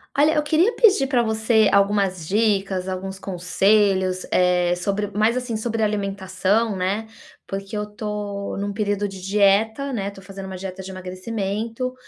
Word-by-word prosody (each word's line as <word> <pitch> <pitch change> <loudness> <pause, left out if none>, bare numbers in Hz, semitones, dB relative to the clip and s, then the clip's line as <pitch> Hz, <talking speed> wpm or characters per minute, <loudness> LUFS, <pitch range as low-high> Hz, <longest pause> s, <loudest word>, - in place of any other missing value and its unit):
Olha, 300 +2 +4
eu 300 - +2
queria 330 +9 +3
pedir 395 - +5
pra 255 -2 +2
você, 220 -1 +3
algumas 200 -4 +2
dicas, 195 -2 +1
alguns 190 +1 -5
conselhos, 190 0 +1
eh, 180 -1 +3
sobre 200 +3 -2
mais 215 +4 +1
assim, 250 -2 -3
sobre 225 0 -1
alimentação, 200 +1 0
né, 195 +4 -1 0.4
porque 195 +2 -5
eu 210 - -2
tô 210 -1 -5
num 200 0 -3
período 205 -1 -1
de 195 -1 -9
dieta, 210 +7 +2
né, 200 -4 -2
tô 200 -1 -12
fazendo 195 0 -9
uma 190 -1 -6
dieta 190 0 -6
de 190 - -8
emagrecimento. 205 +6 -4
200 Hz, 155 wpm, -22 LUFS, 190-220 Hz, 0.4 s, pedir